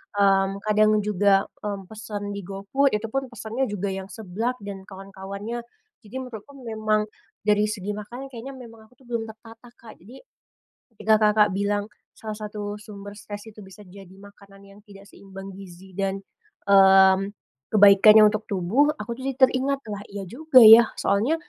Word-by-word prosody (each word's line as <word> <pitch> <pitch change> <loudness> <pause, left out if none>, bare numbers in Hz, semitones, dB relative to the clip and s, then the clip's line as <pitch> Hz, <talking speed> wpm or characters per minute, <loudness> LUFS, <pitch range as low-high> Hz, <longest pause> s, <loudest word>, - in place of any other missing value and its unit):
mmm, 195 0 +2
kadang 215 0 +3
juga, 200 -1 +2 0.2
mmm, 200 -2 -5
pesen 210 -2 -6
di 200 - -5
GoFood 200 +9 0
itu 210 +2 -3
pun 270 0 -2
pesannya 235 +1 -5
juga 200 -1 -3
yang 190 0 -6
seblak 220 +4 -4
dan 195 -1 -8
kawan-kawannya. 195 +3 -7 0.4
Jadi 215 +2 -15
menurutku 255 0 -9
memang 215 -1 -1 0.4
dari 210 0 +2
segi 205 -1 -4
makanan 225 +6 -8
kayaknya 260 +3 -9
memang 225 -3 -14
aku 250 - -27
tuh - - -22
belum 235 -2 -4
tertata, 225 +2 -15
Kak. 225 - -14
Jadi 230 +9 -14 0.8
ketika, 220 +1 +2 0.2
Kakak, 210 0 +4
bilang 205 +1 -1 0.3
salah 215 -1 -7
satu 210 -1 -6
sumber 205 -1 -11
stres 205 0 -9
itu 215 - -22
bisa 195 +1 -14
jadi 190 0 -14
makanan 200 0 -17
yang 200 +1 -17
tidak 200 -1 -16
seimbang 195 -1 -12
gizi 190 -1 -13
dan, 195 0 -2 0.5
mmm, 195 0 +5 0.4
kebaikannya 205 +1 +7
untuk 215 0 -5
tubuh, 200 +9 +1
aku 235 -2 -7
tuh 260 - -7
jadi 270 - -2
teringat, 270 +1 +2
"Lah 205 -1 -6
iya 200 0 -8
juga 270 0 +5
ya." 225 +1 +10 0.2
Soalnya, 210 +10 +1
205 Hz, 160 wpm, -24 LUFS, 195-225 Hz, 0.8 s, ya